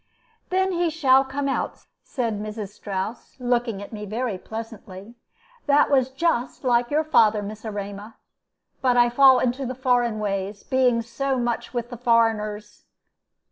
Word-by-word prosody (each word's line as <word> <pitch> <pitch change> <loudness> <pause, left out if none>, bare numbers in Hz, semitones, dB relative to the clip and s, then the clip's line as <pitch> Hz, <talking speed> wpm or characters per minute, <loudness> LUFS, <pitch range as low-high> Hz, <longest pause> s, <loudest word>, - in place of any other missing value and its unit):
"Then 380 +1 +1
he 345 -1 +1
shall 270 -4 +4
come 275 +1 -3
out," 270 - -3 0.2
said 230 -6 -3
Mrs. 210 -1 -5
Strouss, 205 +2 -6
looking 240 -4 -1
at 205 - -11
me 210 -1 -6
very 225 +1 -2
pleasantly. 220 -2 -9 0.5
"That 290 +1 +4
was 260 -2 +3
just 265 -3 -1
like 240 -1 +2
your 305 +2 +1
father, 220 -9 +3
Miss 210 +1 -8
Erema. 205 0 -6 0.7
But 250 -2 +2
I 240 0 +5
fall 265 +1 +7
into 250 +2 0
the 255 0 -4
foreign 245 -3 +1
ways, 200 -1 -3
being 250 -3 +2
so 260 +4 -2
much 240 -1 -2
with 240 0 -4
the 245 - -6
foreigners." 220 -3 0
240 Hz, 150 wpm, -24 LUFS, 215-260 Hz, 0.7 s, fall